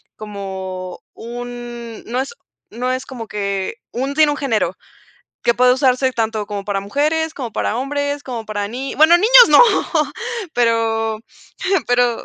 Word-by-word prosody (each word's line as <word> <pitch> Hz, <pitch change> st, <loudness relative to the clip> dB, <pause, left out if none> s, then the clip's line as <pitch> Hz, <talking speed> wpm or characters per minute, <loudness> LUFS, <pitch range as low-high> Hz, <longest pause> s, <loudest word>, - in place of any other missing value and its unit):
como 190 Hz, -3 st, -6 dB
un, 240 Hz, -1 st, -8 dB
no 245 Hz, +2 st, -2 dB
es 275 Hz, -, -6 dB, 0.4 s
no 250 Hz, +3 st, -2 dB
es 255 Hz, 0 st, -3 dB
como 240 Hz, -4 st, -8 dB
que 200 Hz, -2 st, -3 dB, 0.2 s
un 270 Hz, +3 st, -3 dB
sin 310 Hz, 0 st, +5 dB
un 290 Hz, -, -1 dB
género 255 Hz, -8 st, 0 dB, 0.7 s
que 235 Hz, -, +3 dB
puede 250 Hz, +1 st, +4 dB
usarse 260 Hz, 0 st, +2 dB
tanto 220 Hz, -3 st, -1 dB
como 205 Hz, -1 st, -5 dB
para 200 Hz, -1 st, -1 dB
mujeres, 305 Hz, +9 st, 0 dB
como 245 Hz, -7 st, -6 dB
para 220 Hz, -, -1 dB
hombres 285 Hz, +2 st, -2 dB
como 235 Hz, -4 st, -5 dB
para 205 Hz, -1 st, -3 dB
ni 255 Hz, +5 st, -5 dB
bueno, 315 Hz, +3 st, +7 dB
¡niños 480 Hz, +6 st, +8 dB
no!, -, -, +8 dB, 0.9 s
pero 225 Hz, -2 st, +1 dB, 0.7 s
pero 245 Hz, -1 st, +2 dB
240 Hz, 145 wpm, -19 LUFS, 215-270 Hz, 0.9 s, niños